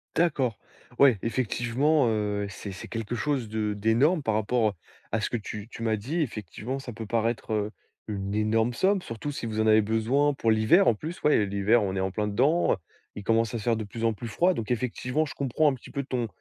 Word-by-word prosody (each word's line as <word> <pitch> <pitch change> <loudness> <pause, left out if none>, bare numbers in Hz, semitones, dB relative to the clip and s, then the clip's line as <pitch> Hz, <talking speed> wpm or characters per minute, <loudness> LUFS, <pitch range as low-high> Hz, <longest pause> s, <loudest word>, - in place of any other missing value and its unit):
D'accord. 135 -9 +1 0.4
Ouais, 130 -8 +6
effectivement, 120 +4 +1
heu, 105 -2 -1
c'est 100 0 -7
c'est 95 - -8
quelque 115 +1 -4
chose 125 -1 -1
de 105 -1 -1
d'énorme 120 - +2
par 110 - 0
rapport 110 0 +1 0.4
à 110 -1 0
ce - - -1
que 120 - -1
tu 105 0 -7
tu 115 - -8
m'as 110 -1 +2
dit. 140 +11 -2
Effectivement, 115 - -4
ça 130 -2 -7
peut 110 0 -6
paraître, 115 +1 -1
heu, 105 0 -1 0.4
une 100 -1 -3
énorme 110 +2 +1
somme. 190 +6 +2
Surtout 115 +4 -5
si 130 - -5
vous 110 -1 -3
en 110 - +2
avez 110 0 +6
besoin 115 +7 +2
pour 115 -4 -1
l'hiver. 110 - +5
En 110 - +5
plus, 160 +9 -7
ouais 150 - +5
et 105 - +2
l'hiver, 100 +3 +2
on 95 -1 -2
est - - -1
en 95 0 0
plein 105 +1 -1
dedans. 135 - +2 0.4
Il 105 - -7
commence 115 +1 +1
à - - -1
se - - -8
faire 115 -2 +2
de 110 - -3
plus 115 +3 -4
en 115 - +2
plus 115 +3 -7
froid. 175 - +2
Donc 115 -3 -4
effectivement, 125 +5 -1
je - - -7
comprends, 140 +3 +1
un - - 0
petit - - -13
peu, 140 - -2
ton 125 -3 -2
115 Hz, 230 wpm, -27 LUFS, 105-130 Hz, 0.4 s, Ouais